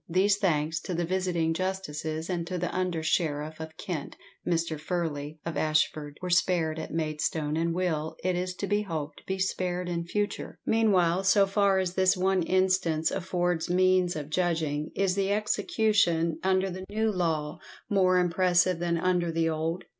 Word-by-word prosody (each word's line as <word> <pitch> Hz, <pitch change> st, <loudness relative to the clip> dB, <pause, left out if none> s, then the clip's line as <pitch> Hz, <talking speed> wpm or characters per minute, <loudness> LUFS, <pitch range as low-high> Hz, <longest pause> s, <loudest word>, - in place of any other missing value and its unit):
These, 195 Hz, +4 st, +3 dB
thanks 160 Hz, -4 st, 0 dB
to 180 Hz, -, -5 dB
the 170 Hz, 0 st, 0 dB
visiting 175 Hz, -2 st, 0 dB
justices 160 Hz, -3 st, -3 dB
and 170 Hz, -2 st, -2 dB
to 180 Hz, 0 st, -3 dB
the 175 Hz, 0 st, -3 dB
under 180 Hz, -3 st, -1 dB
sheriff 155 Hz, -1 st, -1 dB
of 160 Hz, 0 st, -8 dB
Kent, 175 Hz, -8 st, -5 dB, 0.3 s
Mr. 165 Hz, -2 st, 0 dB
Furley, 155 Hz, -3 st, -3 dB
of 165 Hz, -2 st, -3 dB
Ashford, 155 Hz, -1 st, 0 dB
were 180 Hz, -, -2 dB
spared 170 Hz, -3 st, +2 dB
at 160 Hz, -, -6 dB
Maidstone, 155 Hz, -1 st, -1 dB
and 165 Hz, +1 st, 0 dB
will, 165 Hz, -3 st, -1 dB
it 185 Hz, 0 st, +1 dB
is 180 Hz, +1 st, -2 dB
to 200 Hz, -, -3 dB
be 205 Hz, +1 st, +1 dB
hoped, 160 Hz, -7 st, -5 dB
be 190 Hz, -, -1 dB
spared 180 Hz, -1 st, -1 dB
in 170 Hz, -1 st, -2 dB
future. 205 Hz, +3 st, -3 dB
Meanwhile, 195 Hz, -5 st, +3 dB
so 195 Hz, +1 st, +5 dB
far 195 Hz, 0 st, +2 dB
as 185 Hz, -2 st, 0 dB
this 185 Hz, 0 st, +3 dB
one 190 Hz, 0 st, +2 dB
instance 185 Hz, -3 st, +1 dB
affords 175 Hz, -3 st, -1 dB
means 185 Hz, 0 st, +3 dB
of 150 Hz, -1 st, -6 dB
judging, 160 Hz, -3 st, 0 dB
IS 195 Hz, -1 st, +1 dB
THE 195 Hz, 0 st, 0 dB
EXECUTION 200 Hz, -5 st, +1 dB
UNDER 190 Hz, 0 st, +1 dB
THE 185 Hz, +1 st, -6 dB
NEW 220 Hz, +1 st, 0 dB
LAW 160 Hz, -5 st, -1 dB, 0.3 s
MORE 185 Hz, -2 st, +3 dB
IMPRESSIVE 180 Hz, 0 st, +2 dB
THAN 170 Hz, -1 st, 0 dB
UNDER 175 Hz, -1 st, +1 dB
THE 165 Hz, 0 st, +1 dB
OLD? 160 Hz, +3 st, -2 dB
175 Hz, 170 wpm, -28 LUFS, 160-185 Hz, 0.3 s, so